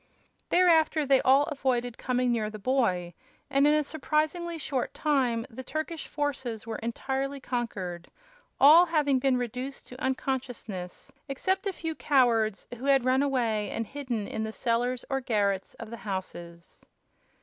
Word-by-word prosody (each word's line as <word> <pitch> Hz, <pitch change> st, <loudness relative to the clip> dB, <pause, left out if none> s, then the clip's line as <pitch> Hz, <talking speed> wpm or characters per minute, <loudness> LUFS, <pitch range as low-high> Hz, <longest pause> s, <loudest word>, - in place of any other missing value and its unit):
Thereafter 325 Hz, -4 st, +4 dB
they 270 Hz, -1 st, +4 dB
all 270 Hz, +2 st, +5 dB
avoided 255 Hz, -5 st, -1 dB
coming 250 Hz, -1 st, 0 dB
near 220 Hz, -3 st, 0 dB
the 215 Hz, -, -8 dB
boy, 195 Hz, -7 st, 0 dB, 0.4 s
and 275 Hz, +1 st, +4 dB
in 300 Hz, -, +5 dB
a 305 Hz, -, +2 dB
surprisingly 315 Hz, +3 st, -1 dB
short 270 Hz, -5 st, -3 dB
time 255 Hz, -6 st, +1 dB
the 255 Hz, +2 st, -8 dB
Turkish 310 Hz, +4 st, -4 dB
forces 265 Hz, -7 st, -3 dB
were 225 Hz, -, -4 dB
entirely 270 Hz, +4 st, -3 dB
conquered, 195 Hz, -9 st, -4 dB, 0.5 s
all 320 Hz, +6 st, +8 dB
having 295 Hz, -5 st, +2 dB
been 260 Hz, -1 st, +2 dB
reduced 250 Hz, +3 st, -5 dB
to 250 Hz, -, -11 dB
unconsciousness 245 Hz, -8 st, -4 dB, 0.2 s
except 375 Hz, +9 st, -1 dB
a -, -, +1 dB
few 325 Hz, -3 st, -4 dB
cowards 235 Hz, -9 st, +2 dB
who 260 Hz, -, -6 dB
had 270 Hz, -3 st, +4 dB
run 260 Hz, +1 st, +3 dB
away 230 Hz, -7 st, 0 dB
and 225 Hz, -, -3 dB
hidden 250 Hz, -6 st, -4 dB
in 220 Hz, -, -3 dB
the 220 Hz, -, -3 dB
cellars 245 Hz, +2 st, -1 dB
or 270 Hz, -1 st, -1 dB
garrets 200 Hz, -5 st, 0 dB
of 230 Hz, -1 st, -9 dB
the 235 Hz, -, -6 dB
houses. 175 Hz, -5 st, -7 dB
255 Hz, 150 wpm, -28 LUFS, 225-285 Hz, 0.5 s, all